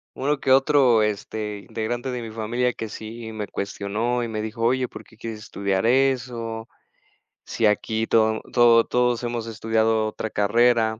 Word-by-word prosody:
uno 145 +1 0
que 130 - 0
otro, 135 -4 +5
este, 105 0 -3
integrante 120 +3 -3
de 125 -1 -4
mi 115 - -6
familia 120 +3 -1
que 110 - -5
sí 110 +1 -8
me 105 -2 -4
cuestionó 105 +5 -2
y - - -2
me 110 -1 -3
dijo: 110 +1 -6
"Oye, 125 +1 +2
¿por - - -11
qué 110 - -21
quieres 110 -1 -6
estudiar 100 0 -2
eso? 120 -3 0 0.8
Si 110 - +1
aquí 110 +2 0
todo 110 -1 +2
todo 120 -1 +6
todos 125 -1 +1
hemos 120 -1 -3
estudiado 110 0 +1
otra 110 +1 -4
carrera". 110 +1 +2
115 Hz, 165 wpm, -24 LUFS, 110-120 Hz, 0.8 s, todo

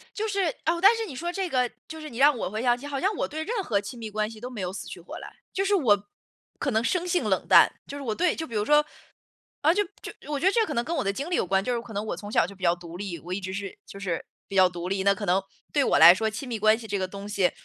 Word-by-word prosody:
就 435 +1 -2
是， 395 -3 +1 0.2
哦， 340 +1 +1
但 400 +5 +7
是 455 - -2
你 310 - -8
说 345 +7 -3
这 375 0 -2
个 250 -4 +1 0.2
就 320 0 -8
是 310 - -7
你 240 -4 -9
让 285 0 +6
我 180 - -2
回 215 +3 -3
想 245 -1 +3
起， 285 - -9
好 280 -2 -3
像 390 +6 +1
我 - - 0
对 310 +1 -5
任 425 +3 -2
何 205 - +1
亲 210 +4 -8
密 225 - -5
关 215 0 -2
系 220 -1 -11
都 245 - -5
没 240 -5 -7
有 180 0 -3
死 - - -7
去 - - -8
活 - - -9
来。 - - -8 0.2
就 390 - 0
是 405 +1 +2
我 205 - +3 0.5
可 280 - -1
能 220 -2 +1
生 360 +8 0
性 355 0 +1
冷 - - 0
淡， - - +8 0.2
就 285 - -6
是 - - -7
我 225 -5 -2
对 355 +8 +2
就 320 - -4
比 235 - -10
如 210 -1 +1
说， 295 +4 +5 0.8
呃， 320 +4 +5
就 415 - +3 0.2
就 - - -7 0.2
我 290 - 0
觉 335 - -1
得 380 - +5
这 455 0 +3
可 - - -4
能 235 - 0
跟 330 - -3
我 275 - 0
的 200 0 0
经 280 +9 -4
历 355 - -1
有 - - +2
关， 195 +2 +2
就 245 - 0
是 235 - -1
可 230 -1 -11
能 205 0 -3
我 195 - -3
从 205 +4 -8
小 210 - +3
就 200 - -11
比 190 - -19
较 170 -1 +4
独 170 -1 -10
立， 185 -2 -5
我 175 +4 -6
一 195 - -3
直 185 0 -5
是， 195 0 -5
就 195 - -11
是 180 -4 -3 0.2
比 195 - -9
较 185 -1 +6
独 175 0 -6
立， 195 0 -1
那 200 +1 +5
可 205 +1 -5
能 185 +2 +2 0.3
对 290 - +3
我 200 - +3
来 170 +3 +10
说 220 +3 -1
亲 235 +5 -6
密 230 - -3
关 215 +1 +5
系 230 - -9
这 205 - -2
个 190 -1 -2
东 200 +1 -8
西， 200 -3 +2
225 Hz, 355 characters per minute, -26 LUFS, 195-305 Hz, 0.8 s, 来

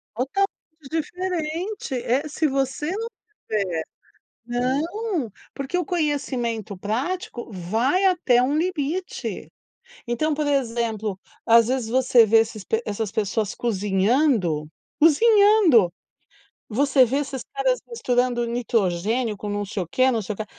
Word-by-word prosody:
Totalmente 275 - 0 0.4
diferente, 340 +1 -3
eh, 255 +5 0
se 310 +1 0
você 270 +3 -1
não 455 +2 -3 0.4
tiver 185 -7 -1 0.6
não, 285 - -1 0.2
porque 275 +6 -3
o 360 - 0
conhecimento 260 - -2
prático 240 - -3
vai 225 - 0
até 275 -10 +3
um 280 +4 +1
limite, 345 +1 -3 0.5
então 270 +7 0
por 295 0 -1
exemplo, 230 -7 -1 0.3
as 230 0 +6
vezes 255 -3 -1
você 250 -1 +5
vê 225 +1 +5
esses 220 -2 -1
p 450 +1 -1
essas 205 0 -3
pessoas 215 0 -1
cozinhando, 205 - +1 0.3
cozinhando, 375 - +5 0.8
você 265 +3 +4
vê 255 +4 +1
esses 270 -3 -3
caras - - +1
misturando 245 - 0
nitrogênio 225 -1 0
com 205 +1 -6
não 205 0 -2
sei 195 -2 -3
o - - -12
quê, 255 +7 +3
não 225 -2 0
sei 210 +2 -4
o - - -13
quê, 215 - -4
255 Hz, 130 wpm, -23 LUFS, 220-310 Hz, 0.8 s, as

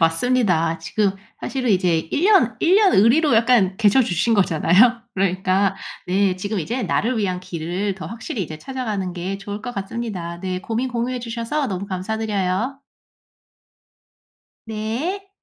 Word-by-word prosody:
맞습니다. 165 -2 +2
지금 195 +4 0 0.3
사실은 255 -4 -2
이제 180 -4 +3
1 330 - 0
년 410 -1 +4
1 350 +3 +3
년 410 -3 +5
의리로 245 +7 +4
약간 225 -5 +3
계셔 225 +4 +4
주신 225 +2 +1
거잖아요. 200 +6 +4
그러니까 190 +1 +1 0.3
네. 190 +1 +2
지금 205 +2 -3
이제 235 +9 -2
나를 245 +3 0
위한 185 -3 -1
길을 180 +3 -3
더 190 - -8
확실히 230 -2 -5
이제 155 -2 -7
찾아가는 215 -7 -4
게 185 +2 -4
좋을 205 +1 -7
것 245 - -5
같습니다. 195 -4 -5
네. 185 -1 -3
고민 230 +5 -2
공유해 245 +1 -2
주셔서 235 +5 -2
너무 195 +1 -4
감사드려요. 205 +4 -2 1.9
네. 240 - -3
205 Hz, 295 characters per minute, -21 LUFS, 185-240 Hz, 1.9 s, 년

